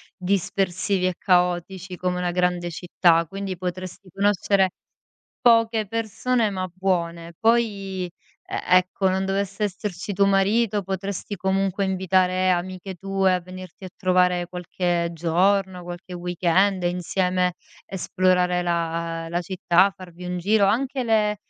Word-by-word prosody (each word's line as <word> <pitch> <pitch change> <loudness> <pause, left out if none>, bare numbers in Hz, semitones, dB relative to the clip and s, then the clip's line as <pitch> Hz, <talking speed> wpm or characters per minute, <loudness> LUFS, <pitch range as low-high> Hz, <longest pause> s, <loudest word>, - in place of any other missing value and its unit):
dispersivi 190 0 0
e 180 - -2
caotici 180 0 0
come 180 0 -1
una 180 -1 -1
grande 180 -1 0
città, 170 -1 +2
quindi 195 0 -5
potresti 185 +1 -6
conoscere 200 -1 +2 0.7
poche 230 -2 +4
persone 230 +2 0
ma 185 -1 -3
buone. 170 -3 -2
Poi, 205 -5 +1 0.5
e - - -2 0.2
ecco 185 +1 -1
non 190 +1 0
dovesse 195 +1 -2
esserci 200 -1 -4
tuo 200 +1 +3
marito, 200 +2 +2
potresti 195 +2 -4
comunque 195 +1 0
invitare 185 -1 +2
amiche 185 +1 -2
tue 195 0 +1
a 180 - 0
venirti 185 0 -11
a 185 - -7
trovare 180 -1 +2
qualche 175 -1 -1
giorno, 180 +3 +1
qualche 175 +1 -8
weekend, 180 +2 +1
insieme, 180 +1 0 0.3
esplorare 180 -1 +1
la 165 -1 -2
la 175 +1 -1
città, 185 +1 +2
farvi 180 -1 -11
un 180 0 -3
giro. 205 +3 +3
Anche 255 +4 0
le 215 -2 +2
185 Hz, 125 wpm, -24 LUFS, 180-195 Hz, 0.7 s, poche